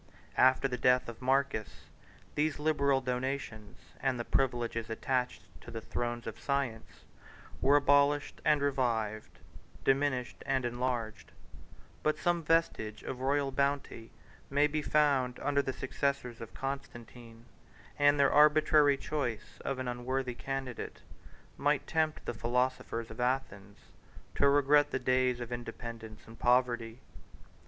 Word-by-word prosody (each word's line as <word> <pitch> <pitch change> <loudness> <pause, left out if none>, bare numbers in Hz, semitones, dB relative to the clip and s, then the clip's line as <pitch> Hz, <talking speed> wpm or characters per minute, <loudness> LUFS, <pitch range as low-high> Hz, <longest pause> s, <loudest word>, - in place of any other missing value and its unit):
148 130 - +7
After 130 +1 -2
the 125 -2 -3
death 125 0 +4
of 120 +1 -8
Marcus, 130 -4 +1 0.6
these 150 0 0
liberal 140 -3 +2
donations, 125 -4 -4 0.2
and 130 -2 0
the 120 - -3
privileges 120 -3 -1
attached 125 -1 -2 0.2
to - - -11
the 115 -1 -5
thrones 120 +1 -3
of 115 - -6
science, 135 -5 -3 0.6
were 140 +2 +5
abolished 145 0 +3
and 150 -2 +3
revived, 115 -6 -1 0.5
diminished 135 -2 0
and 130 -2 +1
enlarged; 120 -2 -3 0.7
but 155 - +1
some 175 -1 +1
vestige 160 -9 0
of 130 - -5
royal 140 +1 +1
bounty 140 -4 -1 0.4
may 145 +2 +3
be 150 +1 -1
found 140 -5 +2
under 140 0 +1
the 135 - -3
successors 130 -3 -2
of 115 - -8
Constantine; 120 -4 -7 0.5
and 145 0 +5
their 140 - +4
arbitrary 150 -1 +5
choice 135 -6 -4
of 135 - -2
an 130 -1 -4
unworthy 125 +1 -2
candidate 135 -1 -5 0.6
might 145 0 +1
tempt 160 -1 -1
the - - -2
philosophers 125 0 -1
of 110 - -10
Athens 105 -6 -2 0.6
to 140 - +4
regret 145 +1 +4
the - - -1
days 130 -1 +1
of 120 0 -6
independence 115 -2 -7
and 115 0 -14
poverty. 120 -1 +1
130 Hz, 130 wpm, -31 LUFS, 120-140 Hz, 0.7 s, 148